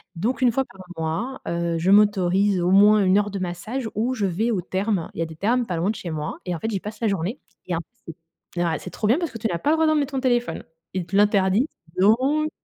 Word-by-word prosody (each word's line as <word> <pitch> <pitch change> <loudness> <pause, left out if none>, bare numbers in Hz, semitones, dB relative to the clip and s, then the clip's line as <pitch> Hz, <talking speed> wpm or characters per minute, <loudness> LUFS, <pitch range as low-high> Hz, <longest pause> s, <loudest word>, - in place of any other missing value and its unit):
donc 230 +11 -2
1 245 -2 +5
fois 265 +3 +1
par 190 - -15 0.2
mois, 165 +12 -3
heu, 170 0 -1
je 180 +3 0
m'autorise 200 -2 +3
au 175 - +1
moins 205 +1 +6
1 190 +1 +4
heure 205 -1 +1
de 200 - -4
massage 215 +8 -4
où 235 +4 0
je 215 -5 -1
vais 215 +7 0
aux 195 - 0
termes. 190 0 -2
Il - - -7
y 165 - +2
a - - -2
des 160 -1 -10
termes 235 +7 +1
pas 180 -4 -3
loin 175 +5 0
de 220 - -1
chez 170 - -6
moi 150 -1 -4
et 180 - -2
en 165 - -6
fait, 225 - -2
j'y 200 -4 -2
passe 210 +2 -8
la 230 - 0
journée. 195 - -2 0.3
Il - - -6
y - - +1
a - - +1
en 170 - -3
plus 205 -5 -13 0.4
c'est 175 - 0
ouais, 160 -2 -1
c'est - - -8
trop 210 - -2
bien, 245 +7 +4
parce 340 -2 -2
que 230 - -7
tu 225 - -1
n'as 175 -5 -2
pas 290 - 0
le 320 - +3
droit 320 0 +3
de 310 - +4
mettre 290 -2 0
ton 270 - 0
téléphone, 245 -2 0 0.3
ils 185 -2 -2
te 195 - -5
l'interdisent 205 +4 +3 0.3
donc 265 +10 +3
205 Hz, 290 wpm, -23 LUFS, 180-240 Hz, 0.4 s, moins